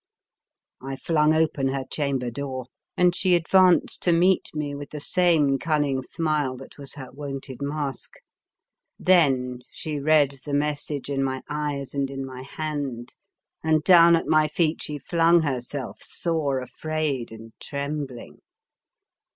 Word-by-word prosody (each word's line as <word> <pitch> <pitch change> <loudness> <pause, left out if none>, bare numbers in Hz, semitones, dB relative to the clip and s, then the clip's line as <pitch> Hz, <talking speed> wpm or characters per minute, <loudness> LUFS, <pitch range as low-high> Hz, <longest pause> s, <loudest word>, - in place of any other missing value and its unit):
I 135 +1 -5
flung 150 +2 +2
open 155 -4 +1
her 135 0 -2
chamber 135 -5 -2
door, 130 0 -5 0.3
and 180 -1 +4
she 185 -2 +3
advanced 180 +1 +4
to 175 - +2
meet 180 +3 +3
me 150 -2 -3
with 145 0 -7
the 150 - -6
same 150 -4 +2
cunning 145 -4 0
smile 150 -2 -1
that 135 +2 -13
was 140 -1 -6
her 135 -3 -8
wonted 135 -1 -7
mask. 140 -1 -4 0.8
Then 135 -9 +3
she 150 -2 -4
read 145 -2 +3
the 145 -1 -2
message 145 -1 -2
in 140 -1 -1
my 130 -1 -2
eyes 145 -2 -3
and 140 -1 -1
in 135 0 -5
my 130 -1 -8
hand, 140 -4 -5 0.5
and 155 -1 +2
down 170 -1 +7
at 165 - -1
my 155 -1 +3
feet 155 +1 0
she 150 -1 -4
flung 170 +4 +3
herself, 130 -2 -4
sore 150 -6 -1
afraid 145 -2 -3
and 110 0 -11
trembling. 140 -3 -5
145 Hz, 145 wpm, -25 LUFS, 135-155 Hz, 0.8 s, down